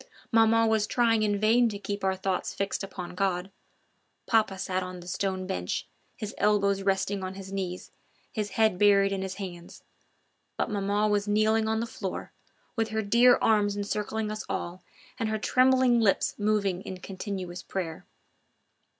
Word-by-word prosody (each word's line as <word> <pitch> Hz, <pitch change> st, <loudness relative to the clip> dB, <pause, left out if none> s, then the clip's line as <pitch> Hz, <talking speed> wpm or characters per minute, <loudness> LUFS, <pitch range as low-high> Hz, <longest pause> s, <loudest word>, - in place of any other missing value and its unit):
Maman 225 Hz, 0 st, +5 dB
was 220 Hz, -1 st, +2 dB
trying 230 Hz, -2 st, +2 dB
in 205 Hz, -1 st, +1 dB
vain 230 Hz, +3 st, +4 dB
to 205 Hz, -, -5 dB
keep 200 Hz, 0 st, -5 dB
our 190 Hz, 0 st, +1 dB
thoughts 190 Hz, -1 st, -2 dB
fixed 195 Hz, 0 st, -2 dB
upon 185 Hz, -2 st, -7 dB
God 185 Hz, 0 st, -1 dB, 0.7 s
papa 215 Hz, -4 st, +2 dB
sat 185 Hz, 0 st, -2 dB
on 185 Hz, 0 st, -6 dB
the 175 Hz, -, -12 dB
stone 190 Hz, 0 st, -2 dB
bench, 90 Hz, -, -3 dB, 0.3 s
his 215 Hz, -1 st, -5 dB
elbows 200 Hz, -1 st, +2 dB
resting 195 Hz, 0 st, 0 dB
on 185 Hz, 0 st, -5 dB
his 195 Hz, 0 st, -8 dB
knees, 185 Hz, -2 st, -4 dB, 0.4 s
his 210 Hz, -3 st, -3 dB
head 220 Hz, -5 st, +3 dB
buried 200 Hz, -1 st, +5 dB
in 195 Hz, -1 st, -2 dB
his 190 Hz, -1 st, -4 dB
hands; 175 Hz, -3 st, -8 dB, 0.7 s
but -, -, -1 dB
maman 205 Hz, +1 st, +1 dB
was 205 Hz, 0 st, +1 dB
kneeling 215 Hz, +1 st, +2 dB
on 220 Hz, 0 st, 0 dB
the -, -, -1 dB
floor, 195 Hz, -4 st, -6 dB, 0.4 s
with 225 Hz, -2 st, 0 dB
her 220 Hz, 0 st, -1 dB
dear 235 Hz, +4 st, +5 dB
arms 205 Hz, -2 st, +3 dB
encircling 210 Hz, +1 st, -2 dB
us 215 Hz, 0 st, -4 dB
all 175 Hz, +2 st, -4 dB, 0.4 s
and 225 Hz, -2 st, 0 dB
her 220 Hz, -, 0 dB
trembling 255 Hz, +1 st, +4 dB
lips 210 Hz, -4 st, +2 dB
moving 205 Hz, -3 st, +1 dB
in 185 Hz, -, -7 dB
continuous 185 Hz, -2 st, -6 dB
prayer. 170 Hz, -4 st, -5 dB
200 Hz, 165 wpm, -28 LUFS, 190-220 Hz, 0.7 s, Maman